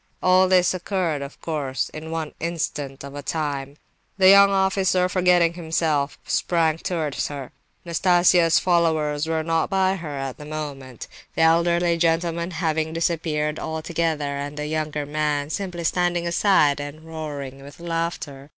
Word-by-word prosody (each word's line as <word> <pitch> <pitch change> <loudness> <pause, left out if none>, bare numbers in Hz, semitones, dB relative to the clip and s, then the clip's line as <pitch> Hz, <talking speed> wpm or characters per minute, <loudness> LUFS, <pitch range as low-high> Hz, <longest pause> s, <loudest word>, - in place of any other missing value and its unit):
All 185 +1 +5
this 185 -1 +4
occurred, 180 -5 -2
of 140 +1 -8
course, 145 -5 -2
in 155 +1 -8
one 160 -2 -4
instant 150 -5 -4
of 140 +1 -8
time. 145 -2 -3 0.4
The 190 -1 +6
young 200 0 +8
officer, 190 -1 +2
forgetting 180 -2 +3
himself, 160 -4 -1
sprang 165 -2 +1
towards 160 -6 -2
her. 140 -3 -7 0.3
Nastasia's 175 -1 +4
followers 160 -4 +1
were 160 -1 -1
not 165 0 0
by 190 -1 +1
her 150 -5 -6
at 135 -1 -5
the 150 - -9
moment 145 -5 -7 0.3
(the 160 - +2
elderly 170 +1 +3
gentleman 170 +1 0
having 160 -2 -1
disappeared 155 -2 -1
altogether, 160 -2 -2
and 145 +1 -5
the 150 - -3
younger 150 -1 -2
man 150 0 -1
simply 180 -3 -4
standing 175 +1 0
aside 170 -5 +3
and 145 +2 -7
roaring 145 -4 -7
with 140 +3 -13
laughter). 165 -5 -4
160 Hz, 140 wpm, -23 LUFS, 150-175 Hz, 0.4 s, young